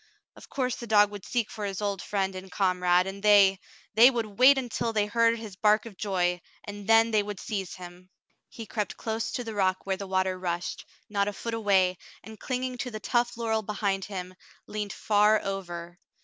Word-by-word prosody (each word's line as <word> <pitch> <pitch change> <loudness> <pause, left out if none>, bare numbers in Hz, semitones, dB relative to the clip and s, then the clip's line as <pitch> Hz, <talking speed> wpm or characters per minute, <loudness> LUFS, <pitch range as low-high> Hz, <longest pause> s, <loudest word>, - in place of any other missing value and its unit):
Of - - -15
course 255 -2 -2
the 235 - -8
dog 205 -1 +5
would 205 -2 -9
seek 235 -3 -1
for 215 - -6
his 195 -2 -3
old 200 -2 -2
friend 195 -2 -1
and 185 0 -9
comrade, 180 -2 +2
and 195 +1 -6
they 200 -2 +5 0.2
— - - -29
they 230 +4 +8
would 225 -5 -4
wait 270 +2 +8
until 240 -2 -2
they 210 -1 +2
heard 230 +2 +2
his 220 -4 -9
bark 210 +3 +3
of 225 -4 -10
joy, 180 -3 -1 0.2
and 205 -1 -8
then 225 0 +5
they 215 -1 +3
would 205 -2 -6
seize 195 -6 -4
him. 180 0 -12 0.4
He 225 - -9
crept 210 -2 -4
close 225 0 -3
to 245 - -2
the 225 -2 -6
rock 190 -2 0
where 190 -1 -1
the 200 0 -6
water 185 0 0
rushed, 175 -1 -4 0.2
not 200 -1 0
a 205 - -2
foot 230 +3 -5
away, 190 -5 +2 0.2
and 220 -1 -11
clinging 255 -1 -3
to 250 - -3
the 215 -2 -6
tough 240 +1 0
laurel 225 -1 0
behind 200 -2 -2
him, 185 -2 -6 0.3
leaned 210 -1 -4
far 210 0 +3
over. 175 -3 -6
205 Hz, 205 wpm, -27 LUFS, 190-225 Hz, 0.4 s, they